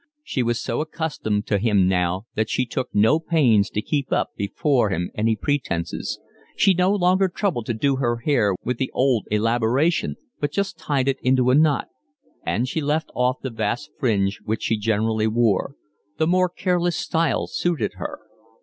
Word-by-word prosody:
She 135 - -2
was 120 -1 0
so 115 - -2
accustomed 150 - -2
to 100 - +1
him 100 -4 +3
now 90 +1 0
that 110 0 -1
she 130 - 0
took 125 +1 -3
no 110 +10 +4
pains 130 -11 +3
to 105 - -3
keep 140 -3 -2
up - - 0
before 120 +4 +1
him 90 -1 -2
any 110 +1 +1
pretences. 110 -10 -2 0.4
She 195 - +5
no 180 +1 +2
longer 190 -1 +3
troubled 175 - -2
to 120 - -1
do 135 +4 +1
her 120 -3 0
hair 115 -6 +1
with 125 -1 -2
the 130 - -1
old 130 -5 +2
elaboration, 115 - +1 0.2
but 145 -1 -1
just 195 +1 -2
tied 140 -3 0
it 135 0 0
in 130 +1 +3
a 125 0 +3
knot; 150 -2 +3 0.6
and 125 - 0
she 160 +4 -2
left 150 +2 -1
off 125 +1 0
the 130 - -3
vast 115 +6 -3
fringe 100 -6 +1
which 110 +1 -3
she 110 - +1
generally 110 0 0
wore: 115 +3 +1 0.4
the 160 - +2
more 180 +2 +3
careless 175 -1 0
style 165 0 0
suited 175 -2 -1
her. - - -6
125 Hz, 175 wpm, -23 LUFS, 110-155 Hz, 0.6 s, She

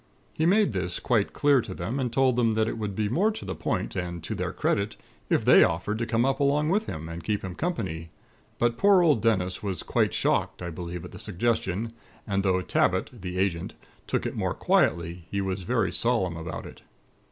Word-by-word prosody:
He 160 - +1
made 205 - +4
this 90 -3 -1
quite 110 -5 +1
clear 145 -3 +3
to 95 -4 -7
them, 110 +10 -3
and 125 -3 -1
told 130 -1 +3
them 115 -2 +2
that 110 0 +2
it 115 - -3
would 105 -3 -3
be 105 0 0
more 175 - +2
to - - -7
the - - -3
point - - -2
and 85 -2 -4
to - - -4
their - - -2
credit, 100 +1 0 0.3
if - - +2
they - - +8
offered 95 +6 -1
to 115 - -1
come 115 +1 +2
up 135 +1 +1
along 145 +2 +2
with 210 +5 +1
him, 80 +1 -5
and 85 0 -7
keep 105 +4 -1
him 95 -2 -5
company. 95 - -3 0.5
But 120 -1 +1
poor 200 -2 +6
old 150 -10 +4
Dennis 95 -5 +1
was 95 -4 -3
quite - - +1
shocked, - - 0
I 85 - -4
believe, 85 +1 -6
at - - -10
the - - -10
suggestion; 110 +1 -1 0.3
and 100 -2 0
though 95 -1 +2
Tabbit, 95 +1 +1
the 90 0 -5
Agent, 90 -3 -1 0.3
took - - -1
it - - -3
more - - -1
quietly, 85 +1 +1
he 100 - -2
was 95 0 -2
very 105 +1 0
solemn 115 -8 +2
about 80 +1 -6
it. - - -11
100 Hz, 215 wpm, -27 LUFS, 90-125 Hz, 0.5 s, they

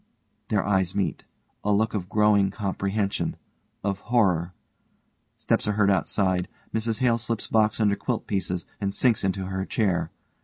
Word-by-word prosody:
(Their 105 -3 +1
eyes 95 -2 +1
meet. 100 - -1 0.4
A 105 - +1
look 110 +2 +2
of 95 -4 -3
growing 105 -1 +4
comprehension, 100 0 -1 0.5
of 100 -1 -1
horror. 95 -8 +2 0.9
Steps - - 0
are 105 - +2
heard 100 -1 +3
outside. 95 -2 +1 0.3
MRS 110 0 0
HALE 120 -2 +4
_slips 115 -1 -3
box 110 -1 +3
under 105 -2 +3
quilt 115 +3 -2
pieces, 90 -3 -2
and 100 -1 -2
sinks 120 -4 +2
into 95 0 -1
her 95 0 -2
chair. 90 -6 0
100 Hz, 150 wpm, -26 LUFS, 95-110 Hz, 0.9 s, growing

